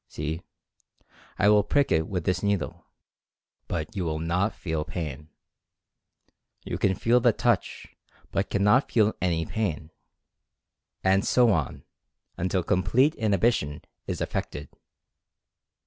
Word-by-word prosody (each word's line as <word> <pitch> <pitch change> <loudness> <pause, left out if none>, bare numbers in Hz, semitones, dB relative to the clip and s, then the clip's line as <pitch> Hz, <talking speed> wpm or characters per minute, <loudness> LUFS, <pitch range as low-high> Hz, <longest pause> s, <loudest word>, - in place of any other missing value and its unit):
See, 80 +3 -4 1.0
I 105 - +3
will 105 0 +6
prick 140 +7 +1
it 80 0 +2
with 90 -4 -3
this 90 +1 0
needle, 100 -5 -2 0.8
but 80 +4 -4
you 95 - -1
will 80 -2 -2
not 90 +6 0
feel 80 -3 -3
pain. 75 -3 -6 1.4
You - - -4
can 95 -1 +2
feel 120 +5 +3
the - - +4
touch, - - 0 0.5
but 95 - -1
cannot 105 +7 +3
feel 110 -2 +3
any 85 -2 0
pain," 80 -7 -3 1.1
and 95 +1 +3
so 120 -2 +4
on, 75 -9 -1 0.5
until 95 +1 -1
complete 105 - +2
inhibition 100 -8 0 0.2
is - - -3
effected. 75 +1 -4
95 Hz, 120 wpm, -26 LUFS, 80-105 Hz, 1.4 s, will